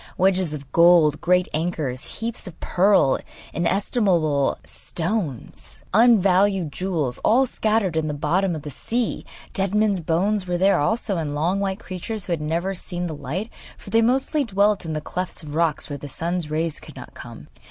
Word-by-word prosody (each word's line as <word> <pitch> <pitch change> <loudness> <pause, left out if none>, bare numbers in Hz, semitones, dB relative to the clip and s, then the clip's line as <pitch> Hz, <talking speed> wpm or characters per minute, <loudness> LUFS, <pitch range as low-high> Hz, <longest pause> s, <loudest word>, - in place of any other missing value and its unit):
Wedges 185 -3 +2
of 140 -3 -8
gold, 170 -3 +5
great 180 +1 +3
anchors, 155 - -3
heaps 230 -3 -4
of 175 - -11
pearl, 190 -7 +3 0.3
inestimable 170 - +1
stones, 170 - -4
unvalued 195 -6 +4
jewels 155 -5 -2
all 255 +5 +4
scattered 215 -7 0
in 160 -1 0
the 150 - -3
bottom 170 +5 0
of 150 - -7
the 150 - -6
sea! 235 - -2 0.3
Dead 195 0 -1
men's 210 -3 +2
bones 185 +5 0
were 175 0 0
there 195 +2 +3
also, 210 +4 0
and 150 -3 -3
long 170 +6 0
white 195 -1 -1
creatures 195 +1 -4
who - - -5
had 160 - -3
never 170 +5 -1
seen 180 -1 -4
the 165 - -4
light, 155 - -5 0.3
for 195 - -12
they 225 +1 +4
mostly 265 +5 +1
dwelt 205 -3 +1
in 160 - -3
the 155 - -3
clefts 180 +2 -4
of 145 -1 -8
rocks 160 -1 0
where 145 -1 -6
the 145 - -7
sun's 170 +2 -3
rays 160 +1 -2
could - - -13
not - - -10
come. - - -11
180 Hz, 175 wpm, -23 LUFS, 155-200 Hz, 0.3 s, gold